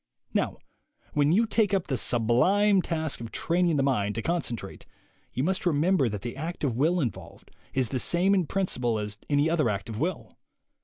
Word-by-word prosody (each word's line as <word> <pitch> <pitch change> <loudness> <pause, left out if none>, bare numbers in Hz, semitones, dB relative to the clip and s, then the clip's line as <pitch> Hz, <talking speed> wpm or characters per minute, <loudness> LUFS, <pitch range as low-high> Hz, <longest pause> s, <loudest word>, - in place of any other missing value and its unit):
Now - - 0 0.6
when 145 0 +3
you 215 +7 +4
take 215 -2 +1
up 190 - -1
the 135 - -2
sublime 180 - +3
task 160 -6 -2
of 115 - -7
train 175 +1 +1
ing 160 - +1
the 135 - +2
mind 105 -7 0
to 115 - -3
concentrate, 165 -9 -3 0.4
you 130 - -2
must 190 +4 -1
remember 165 -3 +2
that 100 -2 -6
the 120 0 -5
act 160 +4 -6
of 130 -6 0
will 160 +8 +2
involved 125 -8 -5 0.2
is 130 -4 +1
the 130 - -2
same 180 +8 +3
in 185 -5 +1
principle 125 - -1
as 105 -1 -5
any 145 +1 +3
other 160 -6 +1
act 100 +1 -3
of 110 -1 -5
will. 170 +3 -4
150 Hz, 195 wpm, -27 LUFS, 120-180 Hz, 0.6 s, you